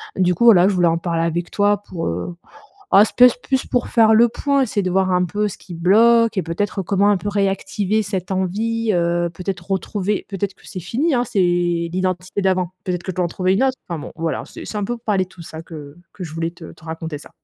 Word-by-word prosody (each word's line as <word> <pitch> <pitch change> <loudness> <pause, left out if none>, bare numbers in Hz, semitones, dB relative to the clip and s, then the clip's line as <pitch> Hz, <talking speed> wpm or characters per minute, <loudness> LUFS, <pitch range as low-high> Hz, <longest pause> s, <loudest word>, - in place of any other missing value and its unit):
Du 180 -1 +2
coup, 235 +8 +1
voilà, 190 -5 +7
je - - 0
voulais 175 -2 +3
en 165 - +2
parler 165 -1 -2
avec 170 +1 -2
toi 205 0 +1
pour, 175 -4 -5
heu 90 - -4 0.6
ah, 205 - +7
c'est - - -6
pèse 250 -1 +7
plus 265 +1 -1
pour 245 - -1
faire 220 -2 +4
le 235 +2 +6
point. 280 +2 0
C'est 210 -3 -1
de 185 - -1
voir 190 0 +1
un 180 0 +2
peu 210 +4 -1
ce 200 - -5
qui 180 - -10
bloque 225 +7 +4
et 190 - +1
peut-être 190 +4 -2
comment 200 +2 +2
un 205 - +3
peu 205 - -5
réactiver 200 +1 0
cette 190 -2 -4
envie, 215 +4 -1
heu, 175 0 +1
peut-être 180 +1 -6
retrouver 195 +2 -2
peut-être, 195 0 -3
c'est 185 - -7
fini, 265 - 0
hein, 240 - +2
c'est 215 - -4
l'identité 175 +2 0
d'avant. 185 -2 +1
Peut-être 180 -2 -2
que 185 - -3
je - - -17
dois 180 - +1
en - - -5
trouver 185 +2 0
une 220 - +1
autre. 260 -1 +1
Enfin, 170 -3 -3
bon, - - -8
voilà, 165 -1 -2
c'est - - -10
c'est 210 - -5
un 205 - -1
peu 240 +3 -3
parler 210 -5 0
de - - -21
tout 175 -2 -13
ça 160 0 -9
que 150 -2 -10 0.2
que 190 - -7
je 155 - -8
voulais 165 0 -2
te 170 -1 -12
te 160 - -19
raconter 160 -2 -5
ça. - - -14
185 Hz, 250 wpm, -20 LUFS, 175-210 Hz, 0.6 s, voilà